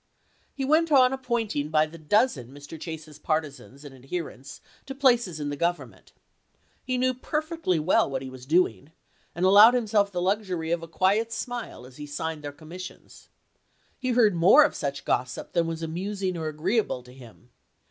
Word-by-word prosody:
He 270 - -2
went 315 +3 +3
on 260 -2 +5
appointing 235 - -2
by 155 0 +3
the 165 +2 -12
dozen 155 - +1
Mr. 145 +3 -11
Chase's 160 -2 -8
partisans 150 -2 -4
and 140 - -10
adherents 135 0 -7 0.3
to 270 - -6
places 240 - +2
in 145 -1 -3
the 145 - -3
Government. 170 +4 -3 0.7
He 255 -1 -2
knew 255 +1 +1
perfectly 305 - -2
what 140 -4 +1
he 130 - -7
was 130 0 -12
doing, 155 - +1 0.4
and 175 +2 0
allowed 205 +5 +8
himself 210 -4 +1
the 180 - -3
luxury 185 -3 -1
of 170 -1 0
a 165 - -8
quiet 200 +7 +1
smile 240 - -5
as 125 0 -15
he 150 0 -8
signed 155 +1 -5
their 145 - -5
commissions. 170 +5 -11 0.7
He 255 - -2
heard 225 -4 +4
more 180 - +7
of 295 - +1
such 140 -1 -4
gossip 125 0 -2
than 170 -2 +1
was 165 0 -4
amusing 185 +3 -3
or 160 -2 -4
agree 160 +9 -1
able 130 - -1
to 125 0 -15
him. 125 -1 -16
170 Hz, 175 wpm, -26 LUFS, 150-225 Hz, 0.7 s, allowed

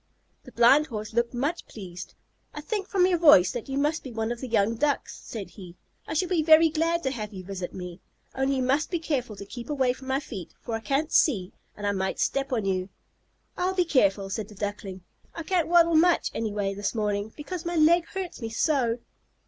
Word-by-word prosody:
The - - -12
Blind 270 +6 +5
Horse 215 -3 -6
looked 235 +1 0
much 285 +8 -2
pleased. 185 -3 -9 0.4
"I 300 - -5
think 390 +4 -3
from 375 -3 +3
your 360 -2 +2
voice 295 - +7
that 240 0 -6
you 270 - -2
must 300 +3 +1
be 260 - -8
one 225 0 -2
of 240 - -5
the 260 - -4
young 225 -2 +2
Ducks," 285 +4 -1
said 200 -6 -7
he. 180 -1 -12 0.3
"I - - -4
shall 365 +4 +1
be 345 -3 +1
very 315 +1 +6
glad 330 +2 0
to 265 - 0
have 215 -5 -5
you 190 -3 -8
visit 185 -1 -5
me, 180 -1 -8 0.3
only 270 +1 0
you 260 - 0
must 275 +5 +1
be 350 - -1
careful 275 -9 -2
to 200 - -9
keep 235 +6 -9
away 265 -4 +1
from 260 +1 -13
my 265 +1 +1
feet, 205 - -9
for 235 - -6
I 225 - -1
can't 280 +6 -1
see, 200 - +2 0.2
and 205 - -5
I 205 - +2
might 190 -1 -2
step 270 0 0
on 225 -5 0
you." 185 -1 -1 0.7
"I'll 370 +1 -1
be 360 -2 +2
careful," 200 - +2
said 210 0 -3
the 210 - -14
Duckling. 200 -2 -5 0.3
"I 330 - -5
can't 350 0 +1
waddle 335 0 +5
much 340 +2 +3
anyway 205 -3 -2
this 205 +3 -3
morning, 210 -1 -1
because 330 +3 -6
my 345 0 -3
leg 330 +2 +4
hurts 375 -7 -6
me 225 - -3
so." 240 -1 +1
250 Hz, 220 wpm, -26 LUFS, 205-315 Hz, 0.7 s, voice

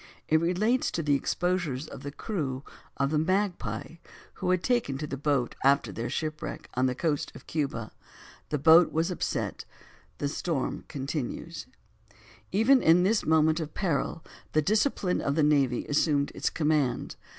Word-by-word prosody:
It 160 0 +3
relates 210 +9 +1
to 165 - -2
the 145 -1 +2
exposures 160 -1 -1
of 135 - -9
the 140 0 -6
crew 145 - -3 0.3
of 140 +1 +1
the 155 - +2
Magpie, 170 - -1 0.4
who - - 0
had 185 -1 +2
taken 240 - +1
to 150 - -4
the 140 - -4
boat, 140 -3 0
after 140 +1 +3
their 115 +1 -4
shipwreck 155 -1 -4
on 130 +1 +2
the 125 - -1
coast 150 0 -1
of - - -12
Cuba. 135 -8 -3 0.6
The 150 - 0
boat 160 +4 +6
was 165 +3 0
upset, 180 - -2 0.5
the 145 - -1
storm 145 -1 -2
continues: 135 -1 -5 0.8
Even 235 +7 +5
in 170 +2 +5
this 210 +3 +1
moment 160 0 +4
of 155 -2 -5
peril, 165 -3 -1 0.3
the 155 - +4
discipline 210 - +1
of 140 - 0
the 155 - +3
navy 140 -5 +2
assumed 145 -1 +1
its - - -1
command. 150 -5 0
155 Hz, 160 wpm, -28 LUFS, 140-175 Hz, 0.8 s, boat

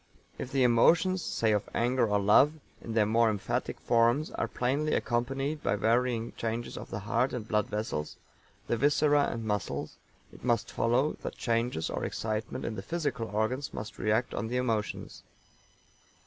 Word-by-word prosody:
If 130 - -5
"the 135 -1 +2
emotions, 170 +10 +4
say 110 -7 0
of 105 -1 0
anger 120 0 +2
or 105 -1 +2
love, 105 +9 +5 0.3
in 115 - -6
their 110 -2 +4
more 115 +2 +3
emphatic 105 -3 -2
forms, 120 +6 +2
are - - -2
plainly 140 +5 0
accompanied 135 +5 -1
by - - +1
varying 115 +2 +1
changes 115 +1 -3
of - - -8
the 105 - -4
heart 115 +5 0
and 115 -3 -4
blood 105 -1 +1
vessels, 105 -8 -3 0.5
the 120 - 0
viscera 145 +2 +3
and 115 -1 -5
muscles," 105 -5 -3 0.4
it - - -15
must 120 -3 +1
follow 125 +6 +2
that - - -6
changes 115 -7 0
or - - -3
excitement 110 0 -3
in 115 - -2
the - - -5
physical 145 -9 -2
organs 110 +6 -2
must 105 0 -7
react 110 +3 +1
on 110 - -2
the 125 +2 -2
emotions. 115 -4 -2
115 Hz, 165 wpm, -29 LUFS, 110-130 Hz, 0.5 s, love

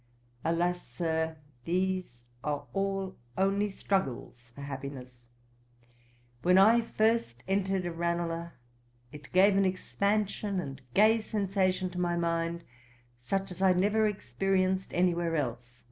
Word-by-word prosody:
'Alas, 175 +2 +1
Sir, 160 +4 -2 0.3
these 185 -8 -1 0.2
are 145 -1 -2
all 195 -1 -1 0.2
only 200 +2 +2
struggles 130 -11 -3
for 140 - -9
happiness. 135 -3 -7 1.2
When 180 +1 +4
I 220 +5 +7
first 220 - 0
entered 195 -1 0
Ranelagh, 170 0 -2 0.6
it 150 -1 -12
gave 195 +2 +5
an 195 - +4
expansion 200 +1 0
and 135 -5 -6
gay 220 +2 +6
sensation 190 -3 0
to 180 0 -3
my 175 -1 0
mind, 170 0 -1 0.6
such 195 +10 -2
as 180 - -8
I 190 -1 +5
never 210 +4 +3
experienced 190 - 0
any 180 0 +3
where 170 -1 -1
else. 120 -4 -3
180 Hz, 120 wpm, -30 LUFS, 160-195 Hz, 1.2 s, I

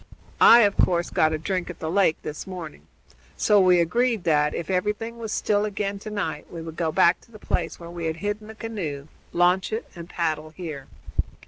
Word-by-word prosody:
I, 235 - +9
of 205 -2 +3
course, 175 -1 +2
got 155 0 +3
a 155 - 0
drink 180 +3 -2
at 180 - -7
the 160 0 -4
lake 185 -4 +3
this 150 +5 -6
morning. 160 - -8 0.5
So 210 -1 +4
we 180 -1 +5
agreed 225 +5 +1
that, 150 -2 +2
if 170 - -4
everything 210 +5 -2
was 220 -2 -5
still 205 -1 +1
again 200 -1 -2
to 215 - -7
night, 175 -8 -4
we 170 - -7
would 160 -1 -8
go 165 -2 -1
back 170 +3 +4
to - - -23
the 215 - -11
place - - -2
where 170 0 -9
we 170 -1 -5
had 160 0 -1
hidden 205 +4 -4
the 220 - -10
canoe, 170 -11 -5 0.2
launch 180 +3 +2
it, 220 +2 -3
and 170 0 -9
paddle 155 -2 -2
here. 155 -5 -7
180 Hz, 210 wpm, -25 LUFS, 160-210 Hz, 0.5 s, I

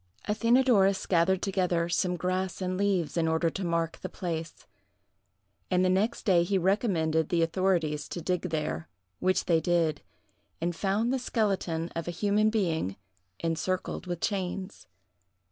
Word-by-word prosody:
Athenadorus 225 -3 +3
gathered 180 +1 +2
together 180 -4 +1
some 180 +1 0
grass 185 +1 -2
and 185 -1 -2
leaves, 185 -4 0
in 165 -1 +2
order 160 +1 +1
to 195 - -4
mark 170 -1 -1
the - - -5
place; 165 -3 -5 1.0
and 185 0 +3
the 185 - +3
next 200 +5 0
day 185 -5 +5
he 190 +3 +1
recommended 170 -5 +1
the 170 -2 +2
authorities 165 -3 0
to - - -4
dig 180 +1 -1
there, 115 - -3 0.3
which 185 0 +1
they 165 -2 +3
did, 170 -3 +1 0.6
and 170 +1 -1
found 210 +7 0
the 265 - 0
skeleton 190 -9 -1
of 165 0 -3
a 175 -1 -4
human 210 +2 +3
being 165 - 0 0.5
encircled 170 +3 -2
with 175 -1 -4
chains. 195 -1 -3
180 Hz, 145 wpm, -28 LUFS, 165-195 Hz, 1.0 s, day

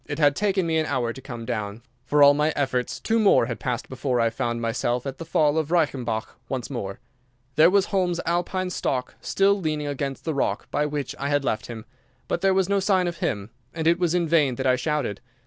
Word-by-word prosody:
It 145 - -4
had 145 -2 +4
taken 195 -1 +1
me 160 -1 +1
an 155 - -1
hour 120 -4 -1
to 135 - -10
come 120 -3 -7
down. 110 -1 -4 0.2
For 145 +1 +5
all 140 0 +8
my 150 +2 +1
efforts 130 -3 -1
two 225 0 +1
more 205 - +5
had 115 -1 -5
passed 125 -2 -3
before 130 -1 -1
I 115 -1 +2
found 120 +1 -2
myself 120 +2 -1
at 135 -1 -5
the 165 - -6
fall 155 -1 +2
of 155 -1 -2
Reichenbach 135 -9 0 0.2
once 130 0 -4
more. 100 -7 -5 0.6
There 155 +3 +7
was 200 0 +3
Holmes's 180 -3 +1
Alpine 180 +2 -1
stock 125 -7 -2
still 200 +1 +2
leaning 155 -3 -1
against 140 -1 -4
the 160 - -1
rock 140 - -1
by 150 - +1
which 145 -1 -3
I 140 - -2
had 145 -1 +1
left 110 - -1
him. 110 -2 -8 0.4
But 170 - -1
there 195 - +4
was 190 -2 +2
no 200 0 +2
sign 190 -1 +2
of 170 -1 -4
him, 105 +2 -2 0.2
and 160 -1 -3
it 170 +2 +4
was 175 -1 +1
in 175 -2 +1
vain 150 -6 +3
that 130 - -4
I 130 -1 +4
shouted. 130 -6 -2
145 Hz, 230 wpm, -24 LUFS, 125-170 Hz, 0.6 s, all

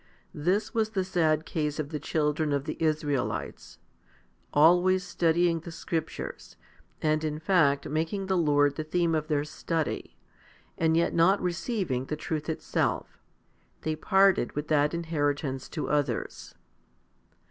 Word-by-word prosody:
This 185 +8 0
was 220 -1 +1
the 195 -4 -1
sad 160 -4 +1
case 150 -2 -2
of 155 -2 -3
the 150 -1 -4
children 150 0 0
of 140 -1 0
the 155 - -3
Israelites; 150 -4 -2 0.7
always 180 +5 +5
studying 170 -2 +1
the 170 +1 -9
scriptures, 165 -1 -5 0.5
and 155 0 +2
in 150 -1 -2
fact 155 -5 +2
making 165 +6 -2
the 190 0 0
Lord 145 -4 +3
the 155 - -2
theme 170 +1 0
of 155 -1 -1
their 145 -2 +1
study, 160 +1 -3 0.6
and 160 0 +2
yet 170 - +2
not 185 +4 +4
receiving 180 - -2
the 150 +2 -4
truth 155 0 -4
itself, 160 - -2 0.6
they 155 0 -1
parted 190 -3 +3
with 150 +1 -4
that 150 +1 +2
inheritance 145 -5 -2
to 155 - -4
others. 145 -5 -2
155 Hz, 135 wpm, -28 LUFS, 150-175 Hz, 0.7 s, always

